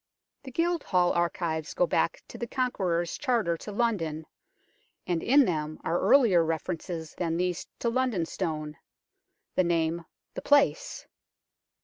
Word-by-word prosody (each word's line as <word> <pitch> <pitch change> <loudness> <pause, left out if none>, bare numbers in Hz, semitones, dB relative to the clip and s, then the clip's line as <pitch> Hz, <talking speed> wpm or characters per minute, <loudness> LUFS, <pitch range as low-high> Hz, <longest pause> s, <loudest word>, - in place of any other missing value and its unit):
The 275 - -9
Guildhall 300 - +1
archives 165 -4 -1
go 180 - +3
back 165 - 0
to - - -9
the 235 - -3
Con 255 +1 0
queror's 175 -4 -1
charter 230 -11 +1
to 210 - -8
London, 185 -9 -1 0.8
and 170 -2 -1
in 275 +3 +5
them 155 -4 -2
are 170 +2 0
earlier 220 -12 +5
references 165 0 -4
than 165 -2 -2
these 180 0 -1
to - - -2
London 235 -8 0
Stone 155 -2 -4 0.8
the 185 - +3
name, 170 -1 0 0.3
the - - -5
place. 290 - +2
175 Hz, 135 wpm, -28 LUFS, 165-235 Hz, 0.8 s, in